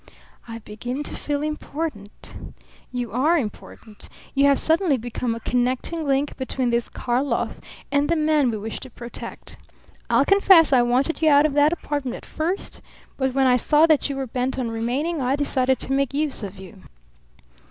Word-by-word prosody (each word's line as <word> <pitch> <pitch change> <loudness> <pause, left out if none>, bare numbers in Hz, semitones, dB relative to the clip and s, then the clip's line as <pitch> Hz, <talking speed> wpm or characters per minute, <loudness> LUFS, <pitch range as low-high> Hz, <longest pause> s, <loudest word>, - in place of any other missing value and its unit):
"I 230 -1 -6
begin 245 +6 -6
to - - -6
feel 290 0 -3
important." 300 -7 -5 0.6
"You 245 -3 -4
are 290 +9 +2
important. 215 -3 -7 0.2
You 275 0 +3
have 280 -1 +5
suddenly 320 -3 +3
become 240 0 -3
a - - -6
connecting 255 +7 -1
link 275 +1 0
between 260 -2 -2
this 235 0 0
Karlov 255 +3 -1 0.3
and 285 +1 +1
the 335 - +3
man 305 -4 +2
we 220 - -2
wish 215 +2 -6
to 260 - -10
protect. 235 0 -9 0.5
I'll - - +4
confess 380 -6 +6
I 250 - +6
wanted 255 +7 +1
you 315 - +5
out 290 0 +6
of 305 - 0
that 290 +1 +4
apartment 290 -6 -3
at - - -11
first; 345 +5 -4 0.3
but 265 -1 -1
when 270 -1 +3
I 250 -1 +5
saw 300 +5 +4
that 310 -3 +2
you 280 - -3
were 270 0 -3
bent 255 +2 -2
on 245 -3 -2
remaining, 265 +8 -2
I 260 +2 +1
decided 265 -2 +1
to - - -4
make 275 0 0
use 295 -3 -1
of 200 -2 -7
you." 190 +1 -12
270 Hz, 180 wpm, -23 LUFS, 245-295 Hz, 0.6 s, confess